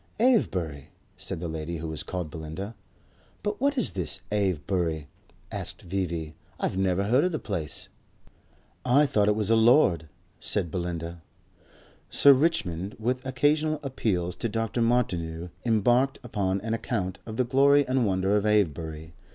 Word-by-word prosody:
"Avebury?" 90 - +1 0.3
said - - -5
the 85 - -4
lady 80 +1 -4
who 80 +1 -5
was 80 -1 -3
called 90 -3 -4
Belinda. 80 +6 -6 0.7
"But 210 +2 -2
what 280 0 +2
is 250 - +2
this 95 0 -2
Avebury?" 90 -5 0 0.5
asked - - -5
V.V. 85 -4 -3 0.3
"I've - - -1
never 95 0 +1
heard 120 +7 +3
of 180 - +1
the 155 - -1
place." 85 - -3 1.0
"I 135 +4 +5
thought 105 -7 +2
it 105 - +3
was 105 0 0
a - - +6
lord," 110 - +4 0.3
said 85 - -1
Belinda. 85 -2 -4 0.9
Sir 140 - +7
Richmond, 105 - 0
with 125 +3 -1
occasional 150 +4 +2
appeals 95 -10 -1
to 115 - -2
Dr. 115 +2 -1
Martineau, 90 -8 0
embarked 120 +4 +3
upon 100 -5 -1
an 110 +2 -2
account 100 -5 -2
of 110 0 -6
the 130 - +3
glory 140 +3 +4
and 130 0 +2
wonder 95 -1 +1
of 105 - +2
Avebury. 80 -6 0
100 Hz, 150 wpm, -27 LUFS, 85-125 Hz, 1.0 s, Sir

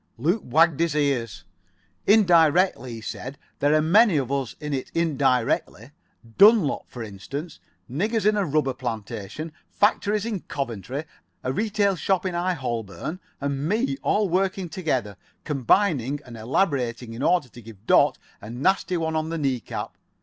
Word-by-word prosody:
Luke 170 - +1
wagged 160 +3 +3
his 165 -3 +1
ears. 135 -7 -1 0.6
"Indirectly," 175 - +4
he 115 - -7
said. 130 +5 -6 0.2
"There 145 +2 +3
are 155 - +3
many 200 +2 +5
of 135 -2 -1
us 135 -4 -2
in 150 -1 -4
it 130 -2 -3
indirectly. 135 -6 0 0.5
Dunlop, 205 -7 +5
for 120 - -7
instance. 135 - -7 0.3
Niggers 205 - -1
in 210 0 +4
a 205 - +1
rubber 150 -5 0
plantation. 115 +3 -5 0.2
Factories 205 0 +1
in 220 -4 -2
Coventry. 135 - -5 0.4
A 130 - -1
retail 205 +1 +1
shop 190 +1 0
in 185 - -1
High 175 +1 0
Holborn. 120 - -4 0.2
And 140 +2 -2
me. 235 +7 +1
All 210 -1 +1
working 185 0 0
together. 130 - -2 0.3
Combining 145 - +1
and 120 -2 -10
elaborating 120 - -1
in 115 - -7
order 175 -2 +2
to 120 - -13
give 110 -2 -14
Dot - - +4 0.2
a 105 - -9
nasty 180 +9 0
one 160 -1 -2
on 155 0 -1
the 165 - -3
knee 135 -5 0
cap. - - -6
150 Hz, 155 wpm, -24 LUFS, 125-185 Hz, 0.6 s, many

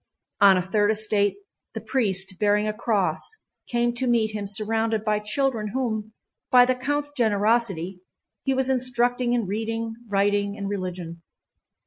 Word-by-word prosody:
On 200 -2 +7
a 180 - 0
third 205 +3 +1
estate 210 -1 +1 0.4
the - - -2
priest, 190 -7 -1
bearing 210 0 +2
a 215 - -1
cross, 205 - -1 0.3
came 240 0 +1
to 250 +2 -2
meet 230 -3 +2
him 210 -2 -4
surrounded 220 +1 -1
by 210 -1 +1
children 220 +1 -1
whom, 220 -4 -2 0.4
by 250 -1 +7
the 255 - +2
count's 290 +3 -2
generosity, 205 - +1 0.4
he 270 -1 +1
was 265 0 +1
instructing 245 -1 +1
in 235 -3 +1
reading, 225 +3 -3 0.2
writing, 200 0 +1
and 200 -1 -4
religion. 180 -4 -5
215 Hz, 145 wpm, -24 LUFS, 200-240 Hz, 0.4 s, On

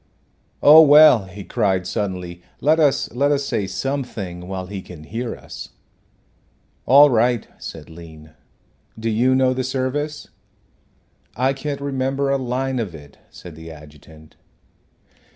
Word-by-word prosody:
"Oh, 155 +2 +9
well," 145 -8 +7
he 95 +2 -10
cried, 95 -6 -1
suddenly, 90 -3 -4 0.2
"let 155 +3 +2
us 145 -4 +1
let 140 +4 +1
us 140 -1 0
say 115 -8 -2
something 100 -10 -5
while 95 -1 -5
he 95 +1 -7
can 85 -4 -12
hear 115 +8 -5
us." - - -10 1.2
"All 140 +3 +7
right," 120 0 +1
said 80 -2 -9
Lean. 80 -2 -13 0.7
"Do 115 0 -2
you 125 +4 +2
know 130 -1 +2
the 130 0 -3
service?" 135 +4 -3 1.1
"I 130 +3 +1
can't 140 +1 -5
remember 135 0 -1
a 140 - +1
line 130 +1 -2
of 100 -8 -4
it," 70 -2 -15
said 85 -3 -12
the 80 +1 -11
adjutant. 75 0 -15
120 Hz, 135 wpm, -20 LUFS, 90-135 Hz, 1.2 s, Oh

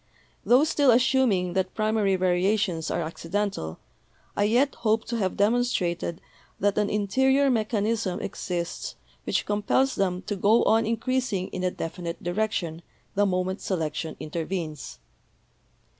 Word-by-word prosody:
Tho 250 +4 +5
still 295 -3 +3
assuming 240 -7 +3
that 190 0 -1
primary 215 -2 +2
variations 185 -1 +1
are 170 - -1
'accidental,' 165 - -3 0.6
I 205 - +2
yet 250 +6 +3
hope 220 -1 +2
to 235 - -3
have 190 -4 -1
demonstrated 200 -7 0 0.4
that 205 +1 +2
an 210 - +1
interior 265 +7 +2
mechanism 215 -3 0
exists 175 -5 -4 0.3
which - - 0
compels 210 +6 +1
them 185 -1 -1
to 205 - -3
go 205 +4 +4
on 225 0 +3
increasing 230 -4 -1
in 185 - -5
a 185 - +2
definite 170 0 -5
direction 175 -3 -1 0.3
the 205 +1 +2
moment 185 +1 -1
selection 160 -3 -2
intervenes. 155 - -4
200 Hz, 130 wpm, -26 LUFS, 180-225 Hz, 0.6 s, Tho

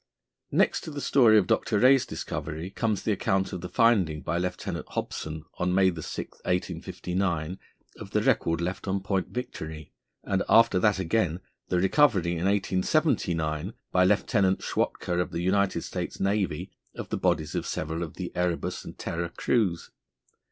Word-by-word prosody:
Next - - +2
to - - -5
the 145 -2 -5
story 120 -6 +5
of 100 - +4
Dr. 105 - +1
Rae's 130 +3 +5
discovery 80 +5 -5
comes 110 -2 -1
the 110 - +1
account 95 -1 0
of 90 - -4
the 90 - -6
finding 100 -10 +3
by 85 - -1
Lieutenant 90 0 -3
Hobson, 80 0 -4
on 90 0 +1
May 95 -1 +5
6, 80 -2 -6
1859, 90 -1 -2 0.4
of - - -8
the - - 0
record 85 0 +2
left 90 +3 -3
on 95 0 0
Point 95 -2 -1
Victory, 80 - -6 0.3
and 95 -1 0
after 115 -5 +6
that 105 0 +3
again, 90 -2 0 0.3
the 90 - 0
recovery, 95 - +3
in 85 +1 -2
1879, 95 - +1 0.2
by 90 - +4
Lieutenant 95 0 +2
Schwatka, 90 0 -1
of 90 - 0
the 85 - -3
United 100 +1 +1
States - - -5
Navy, 95 -4 -1 0.2
of - - -6
the - - -1
bodies 80 -1 0
of - - -2
several 80 +2 -3
of 85 -3 -5
the - - -5
Erebus 90 -1 -1
and - - -10
Terror 85 +1 -3
crews. 90 -2 0
95 Hz, 160 wpm, -27 LUFS, 85-100 Hz, 0.4 s, after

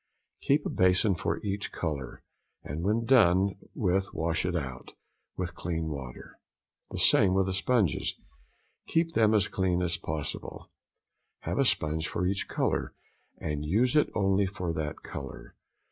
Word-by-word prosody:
Keep 145 +2 +2
a - - -1
bason 95 +3 +3
for 85 - -2
each 100 0 -2
colour, 75 -7 -4 0.4
and 75 +4 -5
when 110 +4 +1
done 100 -6 +5 0.2
with 95 -1 0
wash 85 +3 0
it 90 - -1
out 65 -6 -5 0.4
with 90 -2 -3
clean 80 -2 -3
water. 65 -5 -8 0.5
The - - -6
same 95 -2 +5
with 95 0 +3
the 95 - -2
sponges: 100 -2 +1 0.7
keep 165 0 +1
them 110 -5 +4
as 105 - +3
clean 90 -2 0
as 85 -1 0
possible; 80 -3 -5 0.7
have - - -2
a - - +4
sponge 80 +1 +1
for 90 - -2
each 95 +2 -1
colour, - - -1 0.4
and 75 -1 -3
use 110 - +2
it 150 - +4
only 95 -1 +2
for 90 -3 -3
that 80 -2 -4
colour. 70 -2 -8
90 Hz, 150 wpm, -29 LUFS, 80-100 Hz, 0.7 s, done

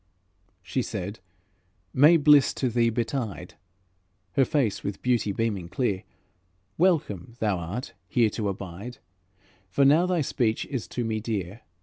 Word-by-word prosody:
She - - -1
said, 100 +4 -5 0.7
"May 150 +6 +7
bliss 145 -2 +5
to 130 - 0
thee 115 0 +2
betide," 115 -2 -3 0.8
Her 135 +7 +3
face 130 -8 0
with 100 -1 -5
beauty 120 -5 +1
beaming 100 -5 -2
clear, 105 -6 -1 0.7
"Welcome 130 - +1
thou 105 -6 0
art 95 +10 -5
here 110 +3 +2
to 105 -2 -2
abide, 100 +5 -7 0.7
For 135 +10 +3
now 155 +6 +5
thy 180 -3 +1
speech 120 -5 0
is 130 -5 -4
to 125 - -3
me 110 -1 -1
dear. 105 -2 -4
115 Hz, 135 wpm, -26 LUFS, 100-135 Hz, 0.8 s, May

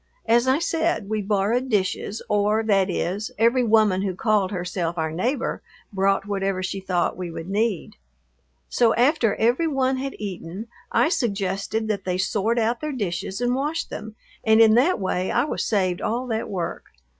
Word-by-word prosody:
As 235 +2 +3
I 260 +1 +4
said, 325 -9 -1
we 215 -1 -1
borrowed 210 +6 0
dishes, 205 0 -1
or, 210 +2 +2
that 195 -3 +2
is, 190 +4 -2
every 235 +3 +3
woman 215 -4 +3
who 190 -2 -2
called 210 -2 +1
herself 180 -2 -3
our 160 -1 -1
neighbor 245 - -2 0.3
brought 195 0 +1
whatever 195 -2 -1
she 195 +1 -3
thought 185 -2 0
we 180 -1 -5
would 165 0 -7
need. 205 - -1 0.7
So 235 -2 +2
after 245 -4 +3
every 245 +9 +2
one 265 -3 +1
had 270 +1 -4
eaten 195 +1 -6 0.2
I - - +3
suggested 210 - -1
that 200 -3 -1
they 180 -1 -1
sort 210 +4 0
out 235 +1 0
their 305 0 -2
dishes 195 -2 -3
and 245 0 +1
wash 300 +5 -1
them, 215 0 -8 0.3
and 220 0 +4
in 220 -1 +7
that 260 +9 +3
way 185 -1 -1
I - - +2
was 295 - -2
saved 185 -5 0
all 240 +4 -1
that 220 0 -2
work. 180 -4 -4
210 Hz, 175 wpm, -23 LUFS, 190-240 Hz, 0.7 s, in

